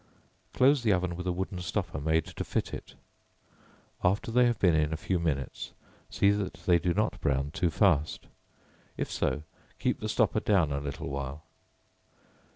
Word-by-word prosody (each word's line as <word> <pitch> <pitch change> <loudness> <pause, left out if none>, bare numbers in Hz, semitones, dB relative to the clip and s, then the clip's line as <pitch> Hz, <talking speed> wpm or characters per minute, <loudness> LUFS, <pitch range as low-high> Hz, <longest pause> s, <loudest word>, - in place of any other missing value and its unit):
Close 135 +1 +4
the 110 -3 +2
oven 90 -2 +1
with 90 +1 -5
a - - +2
wooden 95 +1 -3
stopper 90 -2 -3
made 80 +1 +2
to 90 - -5
fit - - -2
it; - - -8 1.1
after 100 +5 +1
they 125 +1 +5
have 120 -2 +1
been 90 -5 +4
in 75 -1 +2
a 80 - -1
few 90 +2 -1
minutes, 75 -5 -3 0.4
see 100 - +3
that 100 -4 -2
they 85 -2 +5
do 90 - 0
not 105 +4 0
brown 70 +1 0
too 90 0 +1
fast; 80 -4 +2 0.7
if - - -3
so, 75 - -1 0.3
keep - - 0
the - - -3
stopper - - +2
down 90 -8 +2
a 70 - -1
little 70 -1 -5
while. 70 +2 -5
90 Hz, 170 wpm, -29 LUFS, 75-100 Hz, 1.1 s, they